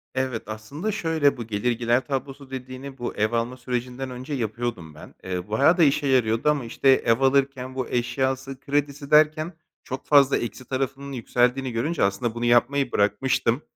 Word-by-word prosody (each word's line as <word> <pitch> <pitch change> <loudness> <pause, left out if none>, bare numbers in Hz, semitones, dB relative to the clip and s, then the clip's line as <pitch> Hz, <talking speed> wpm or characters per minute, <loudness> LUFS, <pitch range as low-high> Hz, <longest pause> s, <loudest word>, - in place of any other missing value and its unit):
Evet, 130 -3 -1
aslında 110 - -5
şöyle: 160 - +1
Bu 115 -2 -6
gelir 110 +3 0
gider 120 +2 +1
tablosu 135 0 -4
dediğini 130 +1 -7
bu 120 - -4
ev 110 +2 +1
alma 120 +2 -1
sürecinden 125 +1 -4
önce 130 +4 -6
yapıyordum 110 - -3
ben. - - -12
Eee, 90 +1 -4
bayağı 140 - +4
da 170 - +5
işe 140 0 +3
yarıyordu 120 +1 +2
ama, 145 -4 0
işte, 125 +4 +1
ev 115 -2 +4
alırken 135 -1 +1
bu 130 -2 -2
eşyası 130 +2 -1
kredisi 140 0 -2
derken 155 +3 +4 0.3
çok 130 - -6
fazla 140 -2 +5
eksi 125 +2 -5
tarafının 135 +2 -3
yükseldiğini 125 +1 0
görünce 145 +9 -1
aslında 100 +4 0
bunu 120 0 -2
yapmayı 135 +4 +3
bırakmıştım. 115 +5 +1
130 Hz, 165 wpm, -24 LUFS, 120-140 Hz, 0.3 s, da